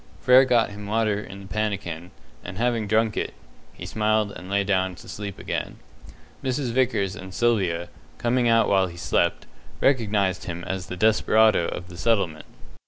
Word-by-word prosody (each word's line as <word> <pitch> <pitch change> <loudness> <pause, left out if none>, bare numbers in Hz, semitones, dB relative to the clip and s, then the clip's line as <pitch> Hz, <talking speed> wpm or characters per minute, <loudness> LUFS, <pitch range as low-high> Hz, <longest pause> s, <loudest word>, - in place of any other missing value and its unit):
Frere 130 +1 +6
got 120 -4 +2
him 100 0 -8
water 110 -1 +1
in 100 -1 -10
the 100 - -11
pannikin, 95 -5 -3 0.3
and 95 - -8
having 115 -2 0
drunk 110 +1 +2
it, - - -3 0.4
he - - -8
smiled 110 -1 +1
and 90 -1 -10
lay 100 0 +2
down 95 -2 0
to - - -14
sleep 100 -2 -6
again. - - -4 0.7
Mrs. 130 -1 -1
Vickers 115 -6 +1
and 95 -2 -9
Sylvia, 95 -8 +1 0.3
coming 120 0 +1
out 115 0 +4
while 95 -2 +3
he 85 -1 -10
still 85 - 0
slept, - - 0 0.3
recognized 105 -8 +1
him 85 -1 -5
as 95 0 -4
the 90 - -6
desperado 110 -2 +4
of 90 - -6
the 85 -1 -11
settlement. 95 -6 0
105 Hz, 170 wpm, -24 LUFS, 95-115 Hz, 0.7 s, Frere